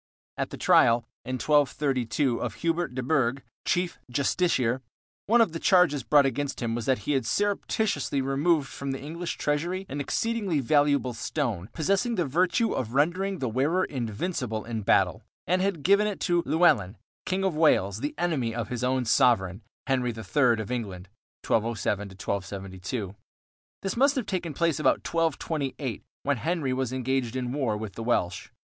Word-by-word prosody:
At - - -2
the - - -7
trial, 115 0 +4 0.2
in 130 - -2
1232, 135 -2 +1
of 115 -4 -3
Hubert 165 -5 -1
de 130 - -2
Burgh, 135 -2 +1 0.2
chief 175 0 0
justiciar, 130 -3 +1 0.5
one 235 +3 +5
of 225 - +3
the 165 - -5
charges 170 -7 +4
brought 145 0 +4
against 140 +1 -2
him 115 -2 -2
was 115 -1 -3
that 130 -6 +1
he - - +2
had 135 -2 +1
surreptitiously 200 - 0
removed 140 +3 +1
from 135 +1 -5
the 135 - -5
English 165 +4 -5
treasury 175 +6 -1
an 145 +1 -4
exceedingly 205 -1 -1
valuable 145 -1 +2
stone, 115 - -3
possessing 195 - 0
the 175 -5 +1
virtue 180 - +1
of 120 0 -3
rendering 185 +7 +1
the 130 - -2
wearer 145 +11 +1
invincible 120 - -3
in 115 -2 -3
battle, - - +2 0.2
and 180 +3 +1
had 190 -6 -1
given 200 +3 +4
it 205 - -3
to 175 -2 +2
Llewellyn, 120 - +3 0.3
King 190 +1 0
of 190 -3 +1
Wales, 110 -11 +3
the 145 +4 -3
enemy 140 -10 -1
of 115 -3 -3
his 125 0 -3
own 130 0 +1
sovereign, 115 -6 +3 0.2
Henry 130 -2 +1
III 115 +2 +1
of 110 +1 -5
England 100 -7 -4 0.4
(1207 105 -2 0
1272). 95 +1 -5 0.7
This 195 - -2
must 275 +4 +4
have 255 -5 -1
taken 175 -6 -3
place 165 -1 +1
about - - +2
1228, 150 -6 -2 0.2
when 140 -1 +1
Henry 155 -1 -1
was 130 -1 -1
engaged 130 -1 -1
in 130 -1 -2
a - - -3
war 125 -7 0
with 105 -2 -6
the - - -7
Welsh. 90 -7 -1
135 Hz, 165 wpm, -27 LUFS, 115-170 Hz, 0.7 s, one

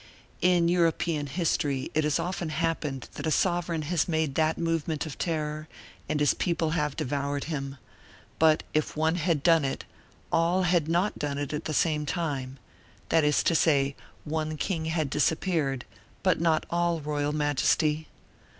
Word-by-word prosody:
In 180 -1 +4
European 165 -3 +1
history 140 -4 -1
it 155 - +2
has 150 - +2
often 175 -2 -3
happened 155 -4 -2
that - - -4
a - - +2
sovereign 170 -1 +1
has 160 +1 0
made 160 -4 0
that 160 +2 +1
movement 165 -2 -1
of 155 - -8
terror 155 -2 -2 0.4
and 155 - 0
his 150 - +4
people 170 -3 0
have 150 -3 0
devoured 140 +1 -2
him; 140 -3 -4 0.6
but 155 -1 +4
if 155 0 0
one 160 +2 +2
had 165 -4 0
done 165 -3 +5
it, 135 - -3 0.5
all 170 +3 +2
had 175 -3 +2
not 175 +5 +1
done 145 -1 -2
it 145 0 -3
at 150 - -3
the - - -2
same 150 -1 +1
time, 140 -6 -2 0.5
that 165 -1 +4
is 150 0 +3
to - - +2
say, 140 -4 +3 0.3
one 155 0 -2
king 160 -1 -2
had 160 -2 0
disappeared, 150 -4 0 0.4
but 185 -3 +2
not 160 -2 +2
all 170 -1 +1
royal 145 -1 -1
majesty. 150 +1 +1
155 Hz, 160 wpm, -28 LUFS, 145-170 Hz, 0.6 s, done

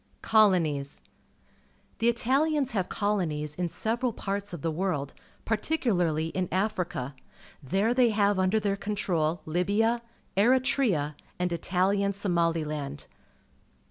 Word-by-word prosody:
Colonies. 170 -10 +2 0.5
— - - -36
The 230 - +3
Italians 270 +4 +1
have 195 -5 -1
colonies 165 -8 -1
in 175 +2 -2
several 235 +7 -1
parts 200 0 -3
of 170 -5 -7
the 165 - 0
world, 155 -5 -2 0.3
particularly 190 - 0
in 185 +1 -2
Africa. 180 - -1 0.5
There 195 - +1
they 250 -1 +4
have 205 -2 +2
under 185 +4 +3
their 200 -1 0
control 180 -6 -1
Libia, 205 +8 +1 0.3
Eritrea, 220 - +2 0.2
and 180 -1 -1
Italian 195 +4 +1
Somaliland. 165 -7 -1
190 Hz, 110 wpm, -28 LUFS, 165-220 Hz, 0.5 s, they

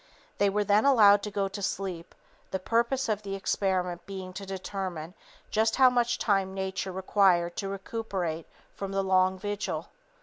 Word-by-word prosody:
They 200 - +4
were 205 +1 +1
then 205 +1 +3
allowed 210 -7 +6
to 210 - -4
go 200 -1 -1
to 195 +1 -7
sleep, 185 -3 -4 0.3
the 190 - -1
purpose 235 +7 0
of 215 -2 -1
the 195 -1 -4
experiment 185 -3 -1
being 190 -2 -7
to 195 +1 -7
determine 185 -3 -5 0.4
just 220 +1 +2
how 260 -2 +6
much 240 0 +1
time 195 -2 +1
Nature 190 0 -3
required 185 -2 +2
to 195 - -3
recuperate 195 -5 -4 0.3
from 195 -1 -5
the 195 0 +1
long 185 0 +3
vigil. 205 +1 -4
195 Hz, 165 wpm, -28 LUFS, 185-210 Hz, 0.4 s, allowed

